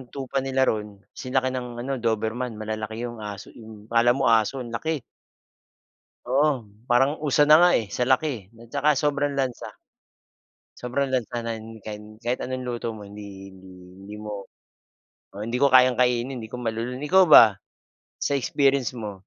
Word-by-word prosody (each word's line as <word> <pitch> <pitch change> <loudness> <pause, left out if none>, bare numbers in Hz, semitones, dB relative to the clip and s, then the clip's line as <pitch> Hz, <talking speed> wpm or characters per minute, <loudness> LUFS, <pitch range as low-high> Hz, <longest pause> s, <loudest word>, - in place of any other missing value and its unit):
tupa 135 0 -2
nila 135 0 0
roon 105 -4 -1 0.2
sinlaki 130 0 -1
ng 125 -2 -5
ano, 135 -1 -3
Doberman. 115 +1 -2
Malalaki 110 +1 -5
yung 120 -1 -6
aso 105 -2 -8
'yong 110 -1 -14
akala 120 +1 +4
mo 115 - +2
aso, 115 +4 +2
ang 120 - -9
laki. 155 +3 -3 1.2
Oo. 135 -1 +1 0.2
Parang 135 +5 +2
usa 145 0 +3
na 155 +2 +7
nga 175 - +7
eh, 110 - -2
sa - - -3
laki 130 +5 +2 0.2
eh, 115 0 -19
at - - -19
tsaka 150 - +2
sobrang 145 -1 0
lansa. 130 -3 -2 1.1
Sobrang 130 +3 -2
lansa, 125 -2 -2
nan 115 -1 -6
kan 105 +1 -10
kahit 120 +2 -2
anong 130 0 -4
luto 120 -1 -3
mo, 105 -2 -10
hindi 100 -1 -10
hindi 95 0 -15 0.3
hindi 105 +2 -9
mo, 105 -2 -6 0.9
oo. 100 - -10
Hindi 115 - -3
ko 140 +1 +3
kayang 130 -1 +6
kainin, 125 0 0
di 110 - -10
ko 125 - -6
malulon. 120 +2 -3
Ikaw 185 +6 +5
ba, 110 -3 +9 0.6
sa 140 - -1
experience 135 -1 +1
mo? 105 -2 -5
120 Hz, 170 wpm, -24 LUFS, 110-135 Hz, 1.2 s, ba